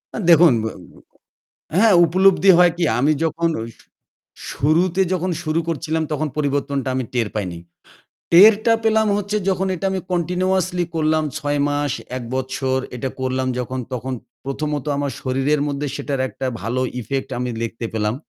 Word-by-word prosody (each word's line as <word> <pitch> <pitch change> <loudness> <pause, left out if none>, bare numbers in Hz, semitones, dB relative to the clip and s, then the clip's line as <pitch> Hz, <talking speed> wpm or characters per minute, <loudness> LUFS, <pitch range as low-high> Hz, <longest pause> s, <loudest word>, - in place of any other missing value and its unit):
আ - - -3
দেখুন, 165 -4 +7
ব - - -2 1.1
হ্যাঁ 220 +1 +5
উপলব্ধি 190 +3 +4
হয় 175 -1 +6
কি? 175 - 0 0.2
আমি 145 +4 +3
যখন 165 +1 0 1.0
শুরুতে 170 +6 +1
যখন 185 0 -1
শুরু 155 0 0
করছিলাম 160 0 -1
তখন 155 +1 -1
পরিবর্তনটা 140 -2 -1
আমি 130 - -1
টের 120 -3 0
পাইনি। 90 -5 -3 0.7
টেরটা 215 +6 +7
পেলাম 220 -1 +3
হচ্ছে 205 +1 -2
যখন 190 0 0
এটা 180 - -5
আমি 190 - -1
কন্টিনিউয়াসলি 180 +1 0
করলাম 155 0 +1
৬ 145 -2 -1
মাস, 145 -2 -1 0.2
১ 125 - -6
বছর 130 0 -1 0.2
এটা 130 +2 -3
করলাম 130 0 -1
যখন 130 +1 -3
তখন 130 +2 -4 0.3
প্রথমত 145 +1 -3
আমার 140 -1 -1
শরীরের 135 +3 0
মধ্যে 145 0 -3
সেটার 140 -2 -3
একটা 135 - -6 0.2
ভালো 120 +4 -2 0.2
effect 135 +4 -3
আমি 125 0 -2
লিখতে 115 0 -4
পেলাম। 105 0 -1
150 Hz, 150 wpm, -20 LUFS, 130-180 Hz, 1.1 s, দেখুন